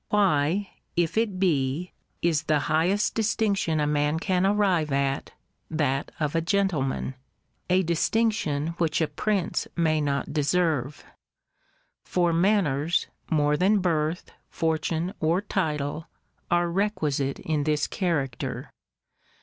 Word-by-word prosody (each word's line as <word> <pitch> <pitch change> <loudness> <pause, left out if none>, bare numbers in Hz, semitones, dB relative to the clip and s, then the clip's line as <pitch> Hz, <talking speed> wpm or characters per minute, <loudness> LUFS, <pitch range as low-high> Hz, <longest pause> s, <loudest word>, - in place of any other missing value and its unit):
Why, 190 -1 +2 0.2
if 170 -1 +1
it 220 -4 +1
be, 160 -1 0 0.3
is 165 -3 +2
the 150 -2 +2
highest 170 +7 +1
distinction 205 -7 +1
a 150 - +2
man 150 +1 +1
can 185 +1 +1
arrive 190 -7 +2
at, 135 0 0 0.4
that 145 -3 -1
of 150 -2 -1
a 165 - +1
gentleman? 165 -8 0 0.6
A 185 +1 +4
distinction 170 -3 0
which 160 -2 +1
a 160 - +2
prince 190 +5 -1
may 155 -2 +2
not 140 -1 -1
deserve. 150 -3 0 1.0
For 175 -2 +1
manners, 170 -4 +2 0.2
more 150 -2 +2
than 190 +6 +3
birth, 165 -2 -1 0.2
fortune, 160 +2 -1
or 165 +3 +2
title, 155 -6 -2 0.4
are 175 0 +2
requisite 155 -8 0
in 150 -3 -2
this 150 -1 +1
character. 150 - -2
160 Hz, 115 wpm, -26 LUFS, 150-185 Hz, 1.0 s, A